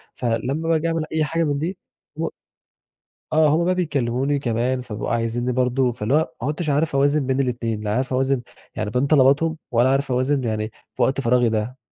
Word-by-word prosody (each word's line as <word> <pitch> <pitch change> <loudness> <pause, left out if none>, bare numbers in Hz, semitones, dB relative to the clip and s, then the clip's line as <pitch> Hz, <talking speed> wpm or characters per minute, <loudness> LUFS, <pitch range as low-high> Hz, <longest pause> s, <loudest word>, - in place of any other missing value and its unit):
فلما 130 +7 -1
باجي 165 0 +2
أعمل 165 -1 -1
أي 160 -1 +1
حاجة 165 +3 0
من 145 -2 0
دي، 175 +5 -3 0.4
و 160 +2 -2 1.1
آه 155 0 +5
هم 165 +3 +2
بقى 185 +1 +2
بيكلموني 140 -4 0
كمان، 125 0 0
فبيبقوا 105 -4 -5
عايزيني 120 +2 0
برضه، 125 0 +1
فاللي 115 +1 -2
هو 150 - +6 0.2
ما 130 - -2
عدتش 155 +1 -2
عارف 145 +1 +1
أوازن 145 +1 +2
بين 135 0 +1
الإتنين، 115 -4 -1
لا 105 0 -1
عارف 130 +1 -1
أوازن 130 0 +1 0.3
يعني - - -2
بين 125 +6 +1
طلباتهم، 150 +3 +4
ولا 120 +1 +3
عارف 135 0 +1
أوازن 130 +2 +1
يعني 110 -1 -2 0.2
في - - -3
وقت 135 +1 +2
فراغي 125 -2 +3
ده. 110 +4 -2
135 Hz, 190 wpm, -22 LUFS, 120-150 Hz, 1.1 s, هو